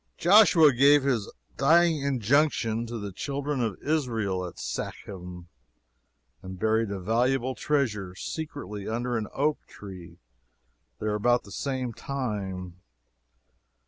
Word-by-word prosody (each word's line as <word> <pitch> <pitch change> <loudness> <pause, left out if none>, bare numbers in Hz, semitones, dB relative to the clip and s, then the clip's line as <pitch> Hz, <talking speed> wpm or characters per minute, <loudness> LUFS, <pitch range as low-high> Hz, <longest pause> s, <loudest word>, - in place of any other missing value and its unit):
Joshua 175 -6 +6
gave 140 +3 +5
his 125 -7 0 0.3
dying 165 +2 +4
injunction 125 -3 +1
to 115 0 -5
the 100 -2 -5
children 140 +6 -3
of 110 -5 -1
Israel 115 -11 -1
at 85 - -11
Shechem, 90 -3 -6 0.9
and 95 0 -8
buried 110 +2 +1
a 100 -1 -4
valuable 125 +6 +1
treasure 110 -12 -1
secretly 105 - -6
under 120 +2 -2
an 110 -2 -2
oak 150 +2 0
tree 90 -4 -11 0.8
there 105 -1 -2
about 120 +4 +2
the 100 - -14
same 130 -2 -3
time. 100 -8 -4
115 Hz, 115 wpm, -27 LUFS, 100-140 Hz, 0.9 s, Joshua